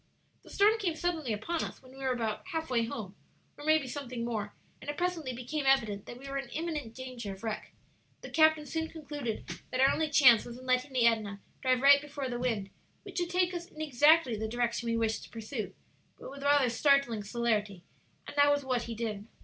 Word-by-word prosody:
"The - - -17
storm 425 +3 +4
came 355 -6 -1
suddenly 320 -6 -1
upon 315 +11 -2
us - - -7
when 255 - -15
we 270 - -13
were 265 -1 0
about 230 - -2
half 320 -5 -3
way 235 -2 +2
home, 215 -4 -6 0.4
or 290 - -11
maybe 310 -2 +3
something 250 -3 -5
more; 215 -3 -3 0.3
and - - -7
it 290 - -3
presently 350 -6 -1
became 255 +4 -3
evident 215 -7 +2
that 240 - -8
we 270 +2 -10
were 275 0 -2
in 270 -3 -7
imminent 300 -7 -4
danger 255 -5 -6
of 190 - -17
wreck. 220 -1 -4 0.5
The - - -9
captain 315 -1 +4
soon 320 +2 -3
concluded 290 -8 -5 0.2
that 255 - -3
our 270 +1 +6
only 315 -1 0
chance 255 -6 +7
was 240 0 -9
in 255 - -12
letting 255 +2 +1
the 245 -2 +3
Edna 215 -3 +1 0.2
drive 255 0 +2
right 280 0 +8
before 285 -2 -5
the 240 -1 -3
wind, 225 -6 -1 0.3
which - - -5
would 350 -1 -1
take 360 0 +1
us 345 0 -5
in 310 - -15
exactly 295 -2 +4
the 220 +1 -3
direction 235 0 -1
we 230 - +1
wished 225 -1 0
to - - -16
pursue, 225 0 -5 0.4
but - - -9
with 280 0 -9
rather 285 -3 +4
startling 275 -4 +3
celerity; 210 -4 -1 0.4
and - - -9
that 285 0 +6
was 285 -1 +1
what 250 -2 0
he 230 - -5
did. 215 -2 -4
255 Hz, 220 wpm, -31 LUFS, 230-295 Hz, 0.5 s, right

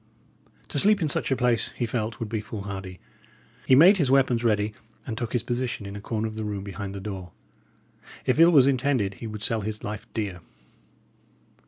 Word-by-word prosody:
To - - 0
sleep 210 0 +5
in 160 -4 0
such - - -1
a 135 - +2
place, 125 -2 +1
he 120 - -1
felt, 110 -1 -3
would 115 - -3
be 110 0 -3
foolhardy. 100 -3 -7 0.7
He 130 - +7
made 180 +9 +8
his 145 -7 +1
weapons 130 -3 +3
ready, 105 -2 +1 0.3
and 115 - -4
took 115 0 -4
his 120 - +1
position 120 -3 -3
in 100 0 -7
a 100 - -7
corner 110 +1 -2
of 110 - -6
the 110 0 -5
room 105 -2 -4
behind 100 0 -6
the - - -5
door. 95 -3 -7 0.9
If 130 - +1
ill 165 +1 +8
was 145 -7 +6
intended, 130 -6 +1
he 115 - -4
would 105 -1 -6
sell 110 +1 +1
his 105 +1 -5
life 105 +2 -5
dear. 100 -5 -3
110 Hz, 200 wpm, -26 LUFS, 105-130 Hz, 0.9 s, made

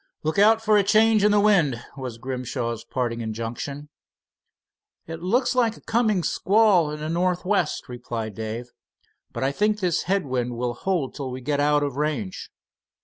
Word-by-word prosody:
"Look 155 +5 0
out 220 +2 +5
for 215 -1 +4
a 205 - +4
change 215 +1 +4
in 210 - +5
the 205 0 +4
wind," 175 - +3 0.2
was 130 -4 -6
Grimshaw's 120 -2 -4
parting 120 -1 -3
injunction. 115 +6 -5 1.2
"It 165 0 -7
looks 245 +9 +1
like 235 -3 +1
a - - -16
coming 215 -5 +1
squall 195 -5 +3
in 150 0 -5
the 155 - -3
northwest," 180 +1 0
replied 120 -3 -5
Dave; 110 +4 -6 0.6
"but - - -4
I 135 - +1
think 210 +7 +1
this 180 -5 0
head 195 -3 +1
wind 125 -2 -2
will 120 0 -1
hold 160 +1 -2
till 140 -3 -5
we 130 0 -5
get 145 +3 -1
out 145 0 +3
of 140 -2 -3
range. 145 -11 -3
150 Hz, 170 wpm, -24 LUFS, 125-200 Hz, 1.2 s, out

